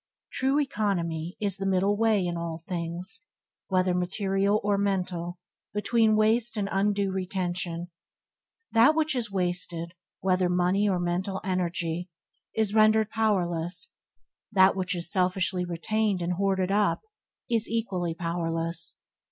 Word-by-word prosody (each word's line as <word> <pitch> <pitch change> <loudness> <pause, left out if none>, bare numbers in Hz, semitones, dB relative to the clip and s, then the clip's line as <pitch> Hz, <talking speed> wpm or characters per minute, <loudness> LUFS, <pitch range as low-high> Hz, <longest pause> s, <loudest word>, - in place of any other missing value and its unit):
True 270 +2 +1
economy 180 - -1
is 200 -3 -1
the 195 - -3
middle 195 +2 +2
way 215 -3 +2
in 175 -1 -2
all 170 -1 -3
things, 170 +2 -4 0.5
whether 185 -1 +2
material 195 +3 +1
or 205 0 +2
mental, 180 -3 -1 0.4
between 220 +1 +3
waste 220 +2 +2
and 200 -1 0
undue 200 0 +1
retention. 180 -2 -3 0.8
That 240 +7 +6
which 310 -2 +1
is 235 -3 -1
wasted, 175 -2 0 0.3
whether 185 -1 +2
money 180 +3 +2
or 185 -2 +1
mental 180 +2 -1
energy, 180 -1 -1 0.5
is 220 -2 +1
rendered 215 0 +4
powerless; 175 -6 0 0.6
that 190 -2 +5
which 185 -1 -1
is 170 -1 -3
selfishly 185 -1 +1
retained 195 +3 0
and 175 +1 0
hoarded 190 0 0
up, 205 0 +2 0.5
is 230 -3 0
equally 190 -7 -1
powerless. 165 -1 -2
190 Hz, 125 wpm, -27 LUFS, 175-210 Hz, 0.8 s, That